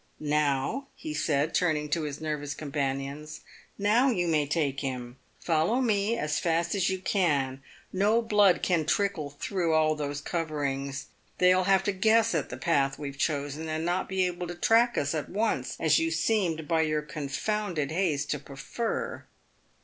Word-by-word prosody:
"Now," 150 - 0
he 310 -1 -6
said, 150 - 0
turning 155 -4 +1
to 165 +3 0
his 150 -2 -4
nervous 150 -2 -3
companions 140 +1 -4
— - - -21
" - - -37
now 220 +6 +3
you 180 -8 0
may 155 -3 +2
take 140 -2 0
him. 125 -2 -5 0.2
Follow 170 +9 +1
me 220 -2 +1
as 150 -4 -1
fast 170 0 0
as 195 -2 +1
you 190 - -1
can. 145 -9 0 0.3
No 205 +4 +3
blood 205 -4 +4
can 165 -4 +1
trickle 195 -8 0
through 165 +3 -1
all 155 0 +3
those 145 -1 -3
coverings. 140 -4 -3 0.3
They 180 0 +5
will 185 0 +2
have 195 -1 +4
to 205 - +1
guess 220 +4 +3
at - - -1
the - - -6
path 140 -5 +1
we 145 -1 -5
have 140 0 -12
chosen, 150 +1 -2
and 155 +1 -2
not 175 +2 -1
be 190 -1 +1
able 180 0 -3
to 175 - -6
track 230 +6 +3
us 145 +1 0
at 155 -2 -3
once, 200 - -1
as 155 -2 +4
you 165 - +1
seemed 165 -2 0
by 165 0 +2
your 155 -1 0
confounded 155 +2 -2
haste 160 -5 0
to 150 - -1
prefer." 140 - -4
160 Hz, 180 wpm, -28 LUFS, 145-190 Hz, 0.3 s, They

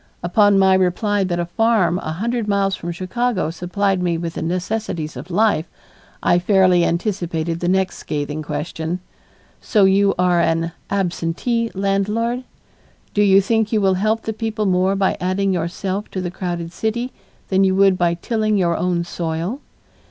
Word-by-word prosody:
Upon 205 +3 +4
my 190 -1 +5
reply 190 +2 +1
that 175 -2 -1
a 175 - 0
farm 185 -3 +2
a 155 - -4
hundred 230 +5 -2
miles 200 -1 +1
from 175 - -5
Chicago 185 0 -1
supplied 180 +3 -1
me 175 -2 0
with 165 0 -4
the - - -5
necessities 175 -2 -3
of 135 +8 -8
life, 185 -3 +2 0.6
I 175 - +4
fairly 185 -2 +4
anticipated 170 -3 -1
the 175 - -2
next 190 +1 +1
scathing 150 +1 -3
question: 160 +3 -4 0.6
"So 210 -4 +2
you 195 +1 +3
are 180 -1 +3
an 165 0 0 0.2
absentee 200 +5 -1
landlord? 210 +6 0 0.7
Do 205 - +2
you 195 -1 +6
think 220 +1 0
you 220 - +2
will 195 -2 +3
help 215 +4 0
the 220 - -3
people 220 -1 -2
more 185 +1 +2
by 195 -1 +1
adding 190 +1 0
yourself 185 +4 -3
to 190 - -4
the 180 -1 -3
crowded 175 -2 -4
city 235 +5 -2 0.4
than 190 0 +3
you 190 -1 +3
would 195 -1 +5
by 170 -1 +2
tilling 215 +3 0
your 170 -3 +2
own 175 -1 0
soil?" 170 - -3
190 Hz, 165 wpm, -20 LUFS, 175-205 Hz, 0.7 s, you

